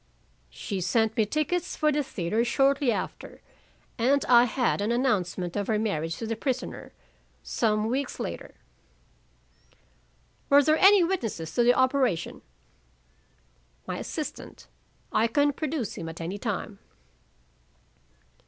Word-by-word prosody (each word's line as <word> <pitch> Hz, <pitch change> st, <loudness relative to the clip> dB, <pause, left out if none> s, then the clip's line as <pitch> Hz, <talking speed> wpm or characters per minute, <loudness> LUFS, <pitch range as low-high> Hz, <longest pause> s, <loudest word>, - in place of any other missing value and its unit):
"She 195 Hz, -3 st, -5 dB
sent 220 Hz, +4 st, +1 dB
me 220 Hz, -2 st, +2 dB
tickets 310 Hz, -, -1 dB
for 305 Hz, 0 st, +2 dB
the 295 Hz, 0 st, +1 dB
theater 215 Hz, -3 st, -1 dB
shortly 270 Hz, +2 st, +2 dB
after. -, -, -5 dB, 0.6 s
And 270 Hz, +4 st, +2 dB
I 240 Hz, -1 st, +6 dB
had 245 Hz, -3 st, 0 dB
an 210 Hz, +3 st, 0 dB
announcement 190 Hz, -8 st, -1 dB
of 205 Hz, -1 st, -2 dB
her 220 Hz, -, +1 dB
marriage 165 Hz, -7 st, -2 dB
to 230 Hz, -, -5 dB
the 225 Hz, +1 st, -2 dB
prisoner, 255 Hz, +2 st, -4 dB, 0.5 s
some 215 Hz, -2 st, 0 dB
weeks 260 Hz, +3 st, -2 dB
later." 85 Hz, -, -6 dB, 1.9 s
"Were 285 Hz, +1 st, +6 dB
there 310 Hz, +2 st, +3 dB
any 390 Hz, -1 st, +7 dB
witnesses 225 Hz, -, -3 dB
to -, -, +2 dB
the 245 Hz, +1 st, +5 dB
operation?" 260 Hz, -, +1 dB, 1.4 s
"My -, -, -4 dB
assistant; -, -, -6 dB, 0.5 s
I 220 Hz, +2 st, +3 dB
can 290 Hz, +3 st, +2 dB
produce 290 Hz, -7 st, -3 dB
him 165 Hz, -, -5 dB
at 165 Hz, -, -9 dB
any 175 Hz, +5 st, -5 dB
time." 205 Hz, -2 st, -4 dB
235 Hz, 125 wpm, -27 LUFS, 205-280 Hz, 1.9 s, any